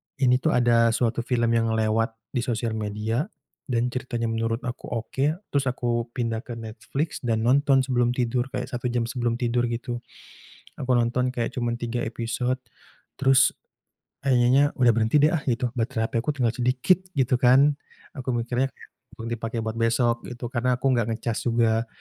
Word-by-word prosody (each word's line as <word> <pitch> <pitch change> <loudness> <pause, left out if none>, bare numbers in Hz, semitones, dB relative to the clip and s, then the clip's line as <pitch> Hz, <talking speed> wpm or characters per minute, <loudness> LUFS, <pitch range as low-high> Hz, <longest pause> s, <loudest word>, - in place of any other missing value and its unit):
ini 125 -2 +3
tuh 155 +4 +1
ada 115 -2 +4
suatu 120 -1 0
film 120 -2 +1
yang 115 -1 +2
lewat 110 +1 +1 0.2
di 125 - -1
sosial 115 -1 -1
media 110 - -2 0.4
dan 120 -1 0
ceritanya 125 -2 -3
menurut 115 0 -1
aku 125 - -6
oke, 115 +3 -2 0.2
terus 140 -1 0
aku 120 -1 -1
pindah 115 -2 -2
ke 130 - -9
Netflix 135 +8 -4
dan 115 -1 0
nonton 135 +1 +4
sebelum 125 -2 +1
tidur, 125 +1 -1
kayak 125 0 -3
1 125 -1 -3
jam 120 -1 0
sebelum 120 -1 -1
tidur, 120 0 +1
gitu. 120 +1 -4 0.8
Aku 130 -1 +2
nonton 120 +2 +1
kayak 120 -2 -2
cuman 120 -2 -1
3 120 0 -3
episode, 120 +2 -2 0.6
terus 135 -1 +5 0.7
akhirnya, 130 +2 +4
udah 125 -3 +4
berhenti 115 +6 +3
deh 150 - +5
ah, 170 - +1
gitu, 120 -1 0
baterai 110 -1 -1
HP - - -16
aku 140 - -1
tinggal 125 -5 +1
sedikit, 125 +8 +2 0.2
gitu 130 -3 +2
kan, 135 +4 +5 0.4
aku 130 - -6
mikirnya 120 +2 0
kayak, - - -17 0.2
perlu 115 - -8
dipakai 115 0 -3
buat 110 +1 -4
besok 115 +1 +1
gitu, 120 -1 -6
karena 125 0 +1
aku 130 - -3
nggak 120 -4 +2
ngecas 115 -1 -3
juga. 115 -1 +2
120 Hz, 170 wpm, -25 LUFS, 115-125 Hz, 0.8 s, terus